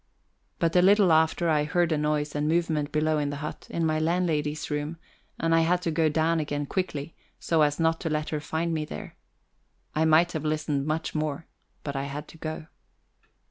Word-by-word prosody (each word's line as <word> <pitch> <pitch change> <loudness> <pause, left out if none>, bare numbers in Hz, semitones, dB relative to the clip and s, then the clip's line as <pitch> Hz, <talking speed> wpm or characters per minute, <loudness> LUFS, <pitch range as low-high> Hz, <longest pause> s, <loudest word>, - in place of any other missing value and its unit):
But 165 0 0
a 180 - +7
little 195 -1 +5
after, 160 +2 +3
I 150 -2 +3
heard 170 +3 +1
a - - +3
noise 150 0 0
and 150 0 -1
movement 160 -3 0
below 155 0 +1
in 145 -1 -1
the 145 - -4
hut, 150 +1 -6
in 170 - -1
my 155 -1 +1
landlady's 155 -3 0
room; 150 +3 -2 0.4
and 165 0 +1
I 165 - +5
had 175 +2 +2
to 165 - 0
go 160 0 +2
down 160 +2 +1
again 145 -1 -2
quickly, 160 -3 -3 0.3
so 165 -2 +1
as 150 +1 +2
not 165 0 +2
to 165 - -2
let 155 0 -1
her 155 - -2
find 160 +3 -2
me 155 -1 -1
there. 75 - -8 0.8
I 155 +1 +2
might 160 +2 +5
have 155 -3 -4
listened 150 -2 -1
much 155 +1 -2
more, 155 0 -2 0.4
but 140 -1 -4
I 135 0 -2
had 145 +2 -6
to - - -13
go. 155 0 -5
155 Hz, 205 wpm, -27 LUFS, 150-165 Hz, 0.8 s, a